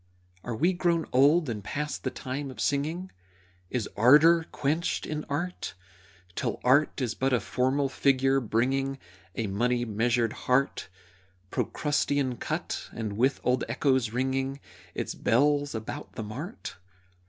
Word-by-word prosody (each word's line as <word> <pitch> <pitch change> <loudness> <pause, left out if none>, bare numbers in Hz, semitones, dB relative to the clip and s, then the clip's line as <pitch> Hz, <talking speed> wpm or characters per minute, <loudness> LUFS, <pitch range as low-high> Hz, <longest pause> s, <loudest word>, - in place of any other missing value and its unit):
Are 120 - -4
we 170 +10 +2
grown 170 -2 +1
old 145 +5 +5
and 110 -4 -4
past 150 +7 -4
the - - 0
time 135 +2 -5
of 130 - -10
singing? 160 +6 -1 0.6
Is 120 -5 -2
ardor 155 +8 +6
quenched 155 +5 -1
in 155 0 -4
art 175 +6 -3 0.6
Till - - -2
art 140 +5 +3
is 125 -4 -1
but 135 0 0
a 125 - +4
formal 130 +6 0
figure, 135 0 +2
bringing 135 +4 0 0.4
A 115 - -1
money 120 +5 0
measured 115 +1 +1
heart, 135 +2 0 0.6
Procrustean 145 -3 0
cut, - - -4
and, 110 -2 -4
with 130 +5 +2
old 125 0 +2
echoes, 130 -1 +2
ringing 130 +3 -1 0.4
Its - - -3
bells 145 +3 +2
about 110 0 -6
the 110 - -5
mart? 140 - -7
135 Hz, 135 wpm, -28 LUFS, 120-145 Hz, 0.6 s, ardor